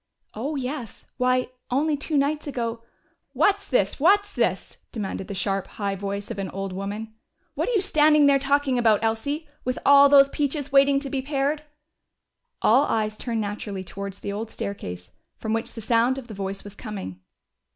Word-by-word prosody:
"Oh, 275 +8 -3
yes. 260 -4 -5
Why, 255 0 +2 0.2
only 295 +4 +1
two 295 +1 -2
nights 295 +2 0
ago 230 -4 -3 0.3
" - - -45
"What's 405 0 +3
this? 200 -7 +1
What's 405 +6 +4
this?" - - -1
demanded 195 -3 -4
the 200 - -5
sharp, 195 0 -1
high 200 -2 -1
voice 200 +2 -4
of 210 - -5
an 195 -1 -3
old 195 0 -5
woman. 205 +3 -5 0.4
"What - - -1
are - - 0
you 415 - +3
standing 305 -5 +4
there 280 -1 +5
talking 275 -2 +1
about, 225 -3 +3
Elsie? 280 +8 -1 0.2
With 255 0 -2
all 280 0 +8
those 275 -1 +8
peaches 285 0 -2
waiting 275 0 +5
to 280 - -5
be 270 - -1
pared!" 285 +2 -1 1.0
All 255 +6 +5
eyes 215 -1 0
turned 230 0 -2
naturally 205 -2 -4
towards 200 +1 -7
the 200 - -4
old 220 +2 -4
staircase, 90 - -6 0.3
from 220 0 -3
which 225 0 -3
the 225 - -6
sound 235 +4 +2
of 270 - -6
the 220 - -8
voice 195 0 -5
was 205 - -10
coming. 200 - -7
240 Hz, 180 wpm, -25 LUFS, 205-280 Hz, 1.0 s, all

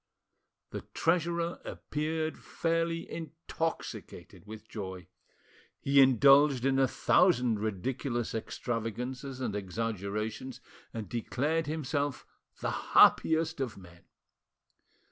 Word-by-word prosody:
The - - -5
treasurer 170 0 0
appeared 155 +1 -3
fairly 165 0 -1
intoxicated 165 -7 -5
with 110 0 -10
joy. 95 -4 -6 0.7
He 140 0 +5
indulged 135 +1 +6
in 135 0 +3
a 135 - +4
thousand 125 - +3
ridiculous 120 +4 -2
extravagances 125 +4 -4
and 115 -6 -2
exaggerations, 105 +4 -3 0.3
and 110 -3 -5
declared 145 - -1
himself 145 -3 -2 0.4
the - - -1 0.3
happiest 160 -1 +5
of 120 -6 -3
men. 90 -2 -15
130 Hz, 90 wpm, -30 LUFS, 110-160 Hz, 0.7 s, indulged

